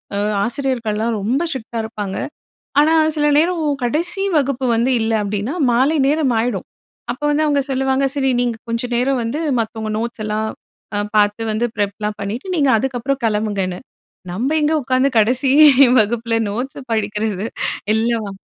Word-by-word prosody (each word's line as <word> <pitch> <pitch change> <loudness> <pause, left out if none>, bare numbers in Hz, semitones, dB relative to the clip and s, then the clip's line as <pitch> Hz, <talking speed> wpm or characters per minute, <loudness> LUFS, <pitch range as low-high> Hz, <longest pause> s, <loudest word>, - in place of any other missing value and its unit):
அ - - -1 0.3
ஆசிரியர்கள்லாம் 230 -3 -1
ரொம்ப 245 +9 0
ஸ்ட்ரிக்ட்டா 235 -4 -5
இருப்பாங்க. 205 -4 -5 0.7
ஆனா 315 +2 +4 0.2
சில 295 -1 +2
நேரம், 335 +1 +1 0.2
கடைசி 340 +9 -1 0.2
வகுப்பு 270 -2 -1
வந்து 235 +3 +1
இல்ல 225 0 0
அப்டின்னா 205 - -3 0.2
மாலை 270 +7 +3
நேரம் 295 -4 +2
ஆயிடும். 225 -5 -2 0.5
அப்ப 270 +4 -12
வந்து 305 +1 +2
அவங்க 285 -1 +2
சொல்லுவாங்க. 265 0 +1
சரி 275 -2 +1
நீங்க 240 -2 0
கொஞ்ச 230 +1 -1
நேரம் 255 +1 +1
வந்து 230 +6 -3 0.2
மத்தவங்க 220 -1 -3
நோட்ஸ் 230 -1 -4
எல்லாம் 215 +1 -1 0.5
அ - - +1 0.2
பார்த்து 210 +2 +2
வந்து 215 +2 -1
ப்ரெப்லாம் 205 +1 -2
பண்ணிட்டு 225 - -5
நீங்க 285 -3 +2
அதுக்கப்புறம் 265 +3 -2
கெளம்புங்கன்னு. 205 -4 -1 0.5
நம்ம 235 +9 -1
எங்க 300 +2 +2
உட்காந்து 260 +2 +2
கடைசி 250 +5 +2 0.5
வகுப்புல 230 +1 0
நோட்ஸ 250 +7 -4
படிக்கறது. 210 -1 -1 0.5
எல்லா 230 +1 +1
வ 200 - -5
235 Hz, 145 wpm, -19 LUFS, 215-270 Hz, 0.7 s, ஆனா